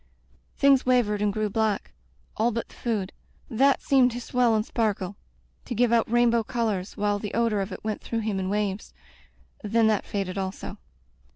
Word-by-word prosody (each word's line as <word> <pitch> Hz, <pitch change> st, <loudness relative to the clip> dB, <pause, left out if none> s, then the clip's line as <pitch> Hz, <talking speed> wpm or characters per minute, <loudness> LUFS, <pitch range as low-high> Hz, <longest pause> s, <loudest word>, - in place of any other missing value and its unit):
Things 275 Hz, -2 st, +5 dB
wavered 235 Hz, -5 st, +2 dB
and 210 Hz, -1 st, +2 dB
grew 215 Hz, +1 st, -1 dB
black 215 Hz, 0 st, -1 dB, 0.2 s
— -, -, -37 dB
all 225 Hz, +2 st, +2 dB
but 230 Hz, 0 st, -4 dB
the -, -, -17 dB
food. 215 Hz, -5 st, -3 dB, 0.4 s
That 270 Hz, +4 st, +3 dB
seemed 265 Hz, -3 st, +4 dB
to 245 Hz, -, -4 dB
swell 245 Hz, -1 st, +2 dB
and 215 Hz, 0 st, 0 dB
sparkle 205 Hz, -5 st, -1 dB, 0.3 s
— -, -, -38 dB
to 245 Hz, -, -4 dB
give 240 Hz, +1 st, +2 dB
out 230 Hz, -2 st, +2 dB
rainbow 240 Hz, -1 st, +4 dB
colors, 220 Hz, -4 st, -2 dB
while 205 Hz, 0 st, 0 dB
the 210 Hz, -1 st, -5 dB
odor 230 Hz, -3 st, +1 dB
of 195 Hz, +1 st, -4 dB
it -, -, -8 dB
went 215 Hz, -1 st, -3 dB
through 230 Hz, -1 st, -3 dB
him 210 Hz, -3 st, -2 dB
in 185 Hz, 0 st, -2 dB
waves. 205 Hz, -1 st, -2 dB, 0.7 s
Then 225 Hz, +2 st, +2 dB
that 215 Hz, -2 st, +1 dB
faded 195 Hz, -1 st, -3 dB
also. 190 Hz, 0 st, -5 dB
220 Hz, 190 wpm, -26 LUFS, 205-235 Hz, 0.7 s, Things